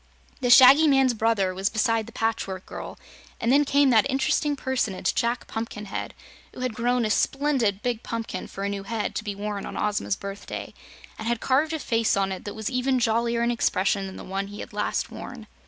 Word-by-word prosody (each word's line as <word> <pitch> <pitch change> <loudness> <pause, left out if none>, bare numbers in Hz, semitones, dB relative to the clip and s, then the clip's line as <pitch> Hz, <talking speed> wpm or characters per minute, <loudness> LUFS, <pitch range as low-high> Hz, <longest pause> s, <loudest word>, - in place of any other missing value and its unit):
The 250 -3 0
Shaggy 265 +5 +9
Man's 270 -3 +4
brother 220 -4 +1
was 190 +2 0
beside 225 0 0
the - - -10
Patchwork 195 -4 -2
Girl, - - -8 0.4
and 235 - +1
then 285 +2 +5
came 280 -1 +3
that 240 +4 +4
interesting 280 +2 +1
personage, 260 -8 -1
Jack 235 0 -1
Pumpkinhead, 210 -3 -5 0.4
who - - -8
had 255 -2 -1
grown 240 +1 +1
a 215 - 0
splendid 260 -8 +1
big 240 -2 -1
pumpkin 230 -1 -5
for 195 - -7
a 200 - -1
new 200 -1 -3
head 215 +2 -3
to - - -3
be 205 -2 -4
worn 205 0 -4
on - - -6
Ozma's 210 -2 0
birthday, 200 +1 -7 0.5
and 220 - -5
had 235 -1 0
carved 285 +6 +1
a - - 0
face 230 -7 +1
on 195 -1 +1
it 190 - -6
that 205 0 -6
was 220 -1 -5
even 260 0 +1
jollier 235 0 +1
in 235 - +2
expression 195 -3 +1
than 190 - -9
the - - -8
one 195 +1 -3
he 205 +1 -8
had - - -9
last 210 0 -2
worn. - - -8
225 Hz, 205 wpm, -25 LUFS, 205-255 Hz, 0.5 s, Shaggy